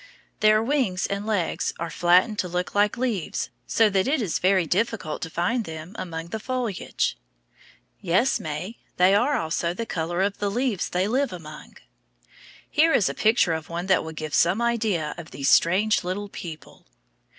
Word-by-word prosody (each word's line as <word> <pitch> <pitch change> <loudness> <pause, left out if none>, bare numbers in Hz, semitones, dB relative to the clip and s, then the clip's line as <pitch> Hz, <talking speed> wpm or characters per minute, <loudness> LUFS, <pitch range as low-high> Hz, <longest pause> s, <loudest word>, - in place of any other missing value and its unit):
Their 215 +1 +4
wings 235 -8 0
and 200 +1 -3
legs 205 -6 -1
are 170 0 -4
flattened 180 +7 +3
to 180 - 0
look 180 +1 -3
like 205 +3 +2
leaves, 235 -9 -2 0.2
so 225 - +4
that 190 +1 +1
it 285 +2 +2
is 205 -9 -1
very 185 -1 +3
difficult 195 -2 -1
to 165 - -4
find 180 +9 0
them 160 +2 -8
among 165 -1 -5
the 220 - -4
foliage. 245 -4 -2 0.8
Yes, 190 +10 +2
May, 160 +9 -5 0.2
they 185 +2 +5
are 245 +8 +3
also 170 +2 -1
the 230 - -3
color 175 -1 -2
of 200 0 -1
the 205 - 0
leaves 235 -2 -1
they 180 +2 0
live 265 +5 0
among. 155 -4 -10 0.9
Here 320 +2 +3
is 195 - +3
a - - -3
picture 215 -6 +3
of 160 -1 -5
one 170 +1 -4
that 190 -1 +3
will 160 - -6
give 155 -1 -6
some 175 +5 +3
idea 220 -10 0
of 170 -1 -9
these 135 +1 0
strange 200 +6 +3
little 195 +3 -4
people. 165 -5 -10
190 Hz, 175 wpm, -25 LUFS, 170-220 Hz, 0.9 s, they